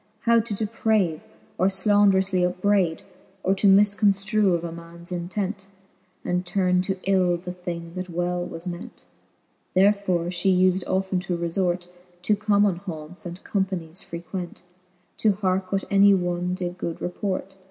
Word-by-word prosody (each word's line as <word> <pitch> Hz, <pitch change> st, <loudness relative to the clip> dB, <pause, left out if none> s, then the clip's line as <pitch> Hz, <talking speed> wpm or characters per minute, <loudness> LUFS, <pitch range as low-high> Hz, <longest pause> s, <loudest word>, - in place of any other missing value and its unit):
How 235 Hz, 0 st, +4 dB
to 220 Hz, -2 st, -3 dB
deprave, 210 Hz, -5 st, 0 dB, 0.4 s
or 185 Hz, -, +4 dB
flanderoufly 195 Hz, -1 st, +3 dB
upbrayd, 180 Hz, -1 st, +1 dB, 0.4 s
Or 190 Hz, -, +3 dB
to 195 Hz, +1 st, +2 dB
mifconftrue 200 Hz, 0 st, +4 dB
of 170 Hz, -, -3 dB
a 170 Hz, -, -4 dB
mans 170 Hz, +1 st, -10 dB
intent, 190 Hz, +3 st, -3 dB, 0.6 s
And 180 Hz, 0 st, 0 dB
turne 180 Hz, -1 st, +1 dB
to 190 Hz, +1 st, -2 dB
ill 185 Hz, -2 st, +2 dB
the 180 Hz, +1 st, -7 dB
thing, 170 Hz, -2 st, -6 dB
that 185 Hz, 0 st, -5 dB
well 175 Hz, +1 st, -1 dB
was 165 Hz, 0 st, -7 dB
ment. 175 Hz, 0 st, -7 dB, 0.7 s
Therefore 195 Hz, -2 st, +3 dB
fhe 180 Hz, +1 st, +2 dB
ufed 185 Hz, 0 st, +3 dB
often 190 Hz, 0 st, 0 dB
to 180 Hz, -1 st, -3 dB
refort 175 Hz, +1 st, -1 dB, 0.4 s
To 210 Hz, -, +3 dB
common 205 Hz, -2 st, +2 dB
haunts, 175 Hz, -1 st, -8 dB
and 175 Hz, +2 st, -8 dB
companies 185 Hz, -4 st, -2 dB
frequent. 175 Hz, +1 st, -7 dB, 0.6 s
To 215 Hz, -2 st, +3 dB
hearke 190 Hz, -1 st, -1 dB
what 195 Hz, -1 st, 0 dB
any 200 Hz, 0 st, +6 dB
one 175 Hz, 0 st, -1 dB
did 180 Hz, -1 st, -5 dB
good 170 Hz, -, -4 dB
report. 190 Hz, +1 st, -4 dB
185 Hz, 145 wpm, -24 LUFS, 175-195 Hz, 0.7 s, any